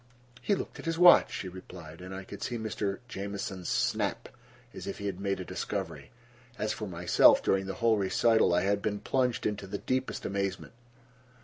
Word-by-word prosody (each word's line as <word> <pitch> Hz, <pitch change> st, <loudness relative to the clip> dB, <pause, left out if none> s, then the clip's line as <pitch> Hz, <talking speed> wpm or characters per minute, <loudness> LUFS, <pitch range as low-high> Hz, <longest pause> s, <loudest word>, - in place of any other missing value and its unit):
"He 205 Hz, -, +2 dB
looked -, -, -6 dB
at -, -, -8 dB
his 165 Hz, 0 st, -1 dB
watch," 175 Hz, 0 st, +7 dB
she 95 Hz, -, -4 dB
replied, 90 Hz, -3 st, -10 dB
and 95 Hz, +1 st, -8 dB
I 95 Hz, 0 st, -6 dB
could -, -, -10 dB
see 120 Hz, -, -2 dB
Mr. 105 Hz, -3 st, -2 dB
Jamieson's 100 Hz, -4 st, -5 dB
snap, -, -, 0 dB, 0.4 s
as -, -, -8 dB
if -, -, -4 dB
he 100 Hz, -, -6 dB
had 95 Hz, -2 st, -3 dB
made 100 Hz, -1 st, -1 dB
a 90 Hz, -, -5 dB
discovery. -, -, -4 dB, 0.5 s
As 105 Hz, -, -1 dB
for 105 Hz, -, -5 dB
myself, 85 Hz, -1 st, +5 dB
during 95 Hz, 0 st, +1 dB
the 95 Hz, -, -4 dB
whole 115 Hz, 0 st, +3 dB
recital 110 Hz, +3 st, +3 dB
I 90 Hz, +1 st, +3 dB
had 100 Hz, +2 st, +1 dB
been 105 Hz, -1 st, -2 dB
plunged 125 Hz, +1 st, 0 dB
into 105 Hz, -2 st, -2 dB
the 100 Hz, +2 st, -4 dB
deepest 130 Hz, +4 st, -2 dB
amazement. 100 Hz, +1 st, -3 dB
100 Hz, 190 wpm, -30 LUFS, 95-110 Hz, 0.5 s, watch